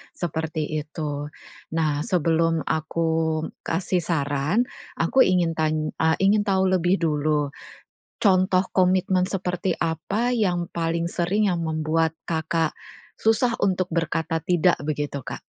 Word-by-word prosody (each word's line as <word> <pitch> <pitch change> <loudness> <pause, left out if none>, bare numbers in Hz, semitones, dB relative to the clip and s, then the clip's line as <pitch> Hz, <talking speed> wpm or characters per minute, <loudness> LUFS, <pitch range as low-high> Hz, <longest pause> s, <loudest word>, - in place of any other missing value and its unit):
seperti 160 -1 -3 0.2
itu. 150 -1 -4 0.5
Nah 155 -3 +1
sebelum 165 -4 +1
aku 160 0 0 0.2
kasih 180 +2 0
saran 150 - 0 0.3
aku 170 +11 +1 0.4
tan 155 -1 0
eee, 160 0 +3
ingin 205 +2 +4
tahu 190 -1 +2
lebih 180 +1 +3
dulu, 150 -2 +1 0.7
contoh 185 -2 +3
komitmen 185 0 +3
seperti 185 -1 -1
apa 170 +9 -1
yang 175 -6 0
paling 165 0 0
sering 195 +5 +1
yang 175 -2 -1
membuat 160 0 0 0.2
Kakak, 160 0 0 0.4
susah 235 +2 +2
untuk 185 -2 +1
berkata 165 -1 -1
tidak? 175 0 +3
Begitu 145 -2 -2
Kak. - - -6
165 Hz, 115 wpm, -24 LUFS, 155-185 Hz, 0.7 s, ingin